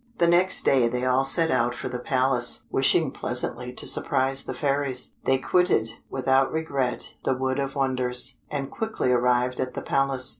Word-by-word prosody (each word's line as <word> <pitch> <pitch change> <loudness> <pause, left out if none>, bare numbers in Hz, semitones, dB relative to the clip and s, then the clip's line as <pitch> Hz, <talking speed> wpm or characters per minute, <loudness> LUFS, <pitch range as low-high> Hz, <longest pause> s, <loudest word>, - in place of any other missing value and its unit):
The 170 - +3
next 175 +2 +3
day 130 -3 +4
they 125 +2 -2
all 130 +1 +2
set 165 +4 +4
out 120 +1 +1
for - - -5
the 125 -1 -5
Palace, 130 -1 0
wishing - - +2
pleasantly - - -2
to - - -5
surprise 135 +1 0
the - - -4
fairies. 140 -3 -1
They 135 - +3
quitted, 135 -6 +1 0.2
without 135 0 +1
regret, 140 -6 -2
the 130 - 0
Wood 130 +1 -2
of 135 0 -3
Wonders, 130 -1 0
and 140 -2 -4
quickly 220 - -2
arrived 125 0 +1
at 130 -1 -3
the - - -5
Palace. 135 -2 +2
130 Hz, 175 wpm, -25 LUFS, 125-140 Hz, 0.2 s, day